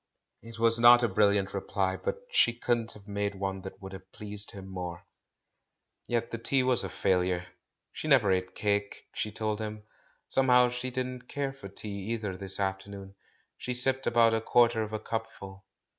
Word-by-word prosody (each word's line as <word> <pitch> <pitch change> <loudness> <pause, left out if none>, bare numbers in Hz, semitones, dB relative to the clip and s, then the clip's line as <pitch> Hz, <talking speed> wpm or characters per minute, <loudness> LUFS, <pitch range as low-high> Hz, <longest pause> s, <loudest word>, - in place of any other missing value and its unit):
It 115 0 -11
was 115 0 +5
not 120 +1 +8
a - - +4
brilliant 100 -1 +2
reply, 95 -1 -1
but 475 - -4
she 120 - +4
couldn't 120 -1 -1
have 100 -1 -15
made 100 0 -2
one 95 0 -3
that 95 - -9
would 95 -1 -9
have 95 0 -11
pleased 105 0 -5
him 95 -1 -9
more. 90 -2 -6 1.0
Yet 120 -1 -1
the 115 - -4
tea 130 +3 +2
was 125 -2 +3
a - - -4
failure. 90 -2 0 0.5
She - - -5
never 125 -9 +5
ate 95 0 -1
cake, 100 0 -1
she 105 - -3
told 110 0 -2
him; 105 -1 -5 0.4
somehow 125 -2 +4
she 125 +1 -4
didn't 125 0 -4
care 140 -1 -3
for 135 -8 -10
tea 100 0 -6
either 105 -5 -3
this 95 +1 -4
afternoon 95 0 -4 0.2
— - - -42
she 125 - -3
sipped 130 +2 0
about 115 -1 +4
a 110 - +1
quarter 115 0 +3
of 110 0 -4
a 110 - -2
cupful. 105 -4 -6
105 Hz, 185 wpm, -29 LUFS, 95-120 Hz, 1.0 s, not